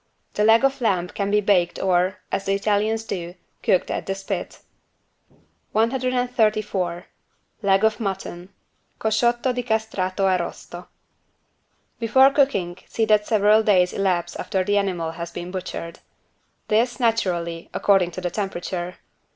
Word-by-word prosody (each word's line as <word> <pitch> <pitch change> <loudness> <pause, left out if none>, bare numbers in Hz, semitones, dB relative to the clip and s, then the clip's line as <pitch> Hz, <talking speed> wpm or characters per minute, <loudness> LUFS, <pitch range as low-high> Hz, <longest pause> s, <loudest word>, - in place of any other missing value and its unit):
The 210 - 0
leg 225 +4 +5
of 270 -1 0
lamb 185 -6 +1
can 200 +1 -3
be 210 +1 +3
baked 190 -4 +2
or, 185 0 +1
as 195 - -2
the 195 - +1
Italians 215 +2 0
do, 175 -5 -5 0.3
cooked 185 - +1
at - - -3
the 195 - -1
spit. 195 0 -5 1.1
134 220 -7 0 0.6
LEG 195 0 +3
OF 220 0 +2
MUTTON 190 -3 -5 0.5
(Cosciotto 240 +3 +1
di 245 - -2
castrato 220 -5 -1
arrosto) 180 -1 -2 1.1
Before 265 +4 +5
cooking 200 -11 +1
see 225 - 0
that 210 -1 +3
several 215 0 +4
days 185 -4 +3
elapse 185 -3 0
after 190 -3 -1
the 205 +2 +2
animal 175 -5 -2
has 170 0 -6
been 175 +1 -7
butchered. 180 -2 -6 0.7
This, 235 +4 +1
naturally, 175 -8 -1
according 195 -3 +3
to - - -7
the 175 - -2
temperature. 180 -2 -4
200 Hz, 135 wpm, -23 LUFS, 180-220 Hz, 1.1 s, leg